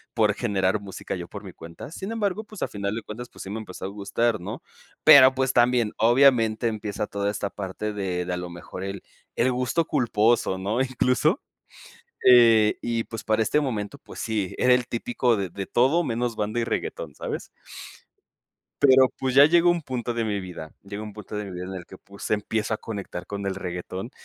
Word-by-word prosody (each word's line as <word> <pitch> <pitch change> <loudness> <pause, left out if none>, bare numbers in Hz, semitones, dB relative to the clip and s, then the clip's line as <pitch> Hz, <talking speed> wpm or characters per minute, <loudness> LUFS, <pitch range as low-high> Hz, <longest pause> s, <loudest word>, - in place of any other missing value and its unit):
por 105 -3 +3
generar 100 -3 0
música 100 -1 -6
yo 85 -2 -6
por 100 +2 -9
mi 95 -3 -9
cuenta. 85 - -10
Sin 195 +5 -6
embargo, 210 -2 -1
pues 215 -2 -7
a - - 0
final 100 +1 -3
de 115 - -5
cuentas 120 +3 -8
pues - - -10
sí 95 - -8
me 110 - -4
empezó 95 -3 -8
a - - -3
gustar, 110 +3 -1
¿no? - - -7 0.4
Pero, 130 -2 +9
pues, 130 0 +1
también, 120 -2 +3
obviamente, 120 -1 +4
empieza 105 -2 -3
toda 100 -1 -2
esta 100 -1 -3
parte 105 +2 -5
de 95 -3 -2
de 90 - -3
a - - -2
lo 90 0 -5
mejor 85 +2 -8
el 100 0 -5 0.3
el 125 +2 +2
gusto 125 +6 0
culposo, 110 -4 +2
¿no?, 105 +6 -1
incluso, 130 - +1 0.9
eh, 115 -4 +6
y, 115 -1 -1
pues, 115 - -8
para 110 0 +2
este 150 +7 +2
momento, 125 -1 -3
pues - - -11
sí, 105 -5 -2
era 125 0 +5
el 125 -1 0
típico 120 0 0
de: 95 -2 -2
"De 95 +3 -6
todo, 140 +8 +3
menos 120 -2 -2
banda 110 +3 -1
y - - 0
reguetón", - - -4
¿sabes? - - -5 1.4
Pero, 130 -2 +7
pues, 130 -1 -1
ya 140 - +9
llegó 175 +2 +5
un 170 -2 0
punto 125 -3 -3
de 115 -1 -1
mi 105 -2 -1
vida 90 -4 -8
llegó 100 +1 -7
un 105 - -8
punto 105 0 -8
de 105 - -3
mi 100 - -8
vida 90 0 -5
en 95 +1 -6
el 90 -2 -7
que, 95 - -12
pues, 100 +1 -9
empiezo 110 +1 0
a - - -2
conectar 100 -5 -6
con 100 0 -5
el 95 - -1
reguetón 95 +4 -5
110 Hz, 210 wpm, -25 LUFS, 100-125 Hz, 1.4 s, Pero